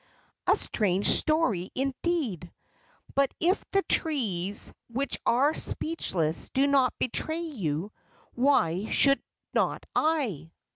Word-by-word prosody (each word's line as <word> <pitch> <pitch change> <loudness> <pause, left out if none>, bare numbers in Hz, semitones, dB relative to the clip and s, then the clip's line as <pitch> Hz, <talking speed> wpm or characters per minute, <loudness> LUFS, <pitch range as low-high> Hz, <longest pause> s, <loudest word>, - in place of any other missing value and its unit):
"A - - +5
strange 200 -2 0
story, 265 - +3
indeed! 265 - -2 0.6
But 275 -1 +2
if 360 +4 +1
the 390 0 +1
trees, 205 - 0
which 265 +4 -1
are 275 +6 +3
speechless, 175 - -1
do 270 +1 +2
not 275 -3 +2
betray 315 +6 -1
you, 195 - -3 0.4
why 220 - +1
should 275 0 +4 0.3
not - - 0
I?" 250 - 0
255 Hz, 105 wpm, -27 LUFS, 185-305 Hz, 0.6 s, A